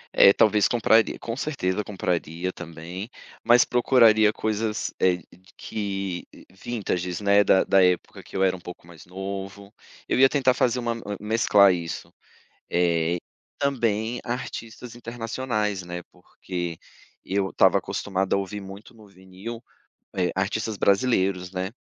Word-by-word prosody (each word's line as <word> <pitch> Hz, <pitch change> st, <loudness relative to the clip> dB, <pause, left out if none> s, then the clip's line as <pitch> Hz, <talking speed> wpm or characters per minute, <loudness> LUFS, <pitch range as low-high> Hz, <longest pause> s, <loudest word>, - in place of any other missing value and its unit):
É, 100 Hz, -, +8 dB
talvez 105 Hz, 0 st, +4 dB
compraria. 115 Hz, -2 st, +3 dB
Com 115 Hz, -, -5 dB
certeza 105 Hz, -9 st, -2 dB
compraria 90 Hz, -2 st, -3 dB
também, 85 Hz, +4 st, -8 dB, 0.3 s
mas 120 Hz, +1 st, +6 dB
procuraria 115 Hz, -4 st, +5 dB
coisas 110 Hz, 0 st, -2 dB
eh, 90 Hz, -1 st, +3 dB
de 90 Hz, +2 st, -21 dB
que 100 Hz, -4 st, -4 dB
eh, -, -, -16 dB
vintages, 95 Hz, -4 st, -3 dB
né, 100 Hz, 0 st, +4 dB
da 95 Hz, -, +4 dB
da 95 Hz, -1 st, +4 dB
época 90 Hz, -1 st, 0 dB
que -, -, -15 dB
eu 95 Hz, -, +2 dB
era 95 Hz, -1 st, +2 dB
um -, -, -10 dB
pouco 90 Hz, -1 st, -11 dB
mais 85 Hz, -1 st, -15 dB
novo. 95 Hz, +2 st, -7 dB, 0.3 s
Eu -, -, +1 dB
ia 135 Hz, 0 st, +7 dB
tentar 130 Hz, -3 st, +3 dB
fazer 125 Hz, 0 st, +1 dB
uma 120 Hz, -1 st, -1 dB
m 115 Hz, -, -8 dB, 0.2 s
mesclar 105 Hz, -2 st, +4 dB
isso, 85 Hz, -2 st, -6 dB, 0.6 s
eh, 85 Hz, -1 st, +1 dB
e -, -, -4 dB, 0.4 s
também 120 Hz, -4 st, 0 dB
artistas 120 Hz, -1 st, -6 dB
internacionais, 115 Hz, -3 st, -3 dB
né, 90 Hz, 0 st, -6 dB
porque 85 Hz, -3 st, -6 dB, 0.5 s
eu 95 Hz, 0 st, 0 dB
estava -, -, +4 dB
acostumada 95 Hz, -1 st, -2 dB
a -, -, +1 dB
ouvir 100 Hz, +1 st, -5 dB
muito 95 Hz, +4 st, -11 dB
no 110 Hz, -2 st, -17 dB
vinil, 95 Hz, +5 st, -10 dB, 0.5 s
eh, 90 Hz, -1 st, +1 dB
artistas 105 Hz, +3 st, -2 dB
brasileiros, 95 Hz, -4 st, +1 dB
né, 95 Hz, +1 st, -3 dB
100 Hz, 145 wpm, -25 LUFS, 90-115 Hz, 0.6 s, É